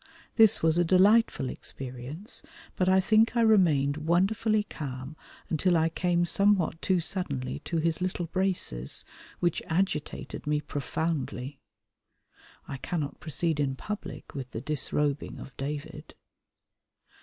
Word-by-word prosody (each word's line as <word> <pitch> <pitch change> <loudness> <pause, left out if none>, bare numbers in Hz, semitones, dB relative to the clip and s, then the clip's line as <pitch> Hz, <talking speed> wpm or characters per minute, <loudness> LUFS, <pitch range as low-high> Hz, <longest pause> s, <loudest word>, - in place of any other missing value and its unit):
This 220 -6 +5
was 160 +1 +3
a - - +5
delightful 190 - +4
experience, 130 - -7 0.3
but 185 0 +2
I 190 0 +5
think 220 +4 +3
I - - +4
remained 160 -11 +4
wonderfully 195 +7 +2
calm 135 -5 -7 0.3
until 175 +2 +2
I 160 0 +2
came 175 +1 +1
somewhat 185 -2 +2
too 185 -2 +2
suddenly 70 - -3
to 170 - -2
his 165 +1 0
little 180 -1 -1
braces, 170 - +1 0.4
which 175 -2 +1
agitated 160 -4 -2
me 150 0 +2
profoundly. 145 -2 -3 1.1
I 135 - -5
cannot 150 0 -4
proceed 160 0 -2
in 135 -2 0
public 210 +9 -7
with 135 -4 -6
the 115 - -6
disrobing 145 0 -1
of 135 - -10
David. 150 +2 -6
160 Hz, 125 wpm, -28 LUFS, 140-185 Hz, 1.1 s, This